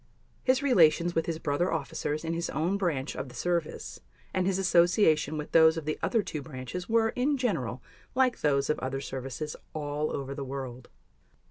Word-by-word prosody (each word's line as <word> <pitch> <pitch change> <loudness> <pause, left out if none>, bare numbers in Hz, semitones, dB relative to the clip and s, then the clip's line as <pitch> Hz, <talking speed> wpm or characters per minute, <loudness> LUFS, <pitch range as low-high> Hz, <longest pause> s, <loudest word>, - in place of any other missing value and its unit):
His 260 +2 +3
relations 170 - +4
with 165 - 0
his 165 -2 -1
brother 160 +4 0
officers 155 0 -2
in 165 - -1
his 170 0 -2
own 165 +7 0
branch 160 -8 -1
of 135 - -5
the 125 - -13
service 170 +3 -2 0.3
and 185 -1 +1
his 190 -1 +1
association 170 -4 +3
with 150 - -5
those 160 0 +6
of 160 - -4
the 155 - -2
other 225 -3 +1
two 150 - -4
branches 140 - -6
were, 225 0 +3
in 275 +5 0
general, 130 - -1 0.3
like 255 -2 +2
those 140 -2 +2
of - - -2
other 130 +1 -3
services 135 +3 -5 0.2
all 150 0 -2
over 140 0 -4
the 140 - -5
world. 130 -2 -6
155 Hz, 185 wpm, -29 LUFS, 140-180 Hz, 0.3 s, those